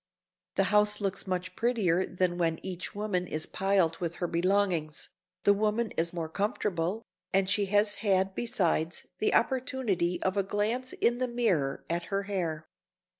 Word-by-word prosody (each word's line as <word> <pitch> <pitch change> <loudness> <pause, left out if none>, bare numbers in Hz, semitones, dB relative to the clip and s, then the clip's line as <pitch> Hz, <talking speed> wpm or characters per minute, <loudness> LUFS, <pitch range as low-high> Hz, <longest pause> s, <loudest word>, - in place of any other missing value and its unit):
The - - +3
house 210 0 +4
looks 195 -1 -2
much 185 -1 -3
prettier 210 -7 +2
than 180 -1 0
when 165 -2 +1
each 185 0 -5
woman 200 -4 -1
is 155 0 -2
piled 190 -4 +1
with 170 -2 -3
her 175 - -2
belongings, 175 -3 0 0.3
the 205 - +6
woman 215 +2 0
is 165 +1 0
more 170 -2 -3
comfortable, 195 +1 -1 0.3
and 195 0 +3
she 200 +1 +2
has 205 +1 +4
had 190 -2 +2
besides 175 -7 0
the - - +2
opportunity 230 -9 +1
of 190 +1 0
a - - +4
glance 215 +6 -1
in 240 +1 +1
the 255 - +1
mirror 190 - 0
at 170 +1 -2
her 200 0 -1
hair. 170 -6 -3
190 Hz, 160 wpm, -29 LUFS, 170-210 Hz, 0.3 s, the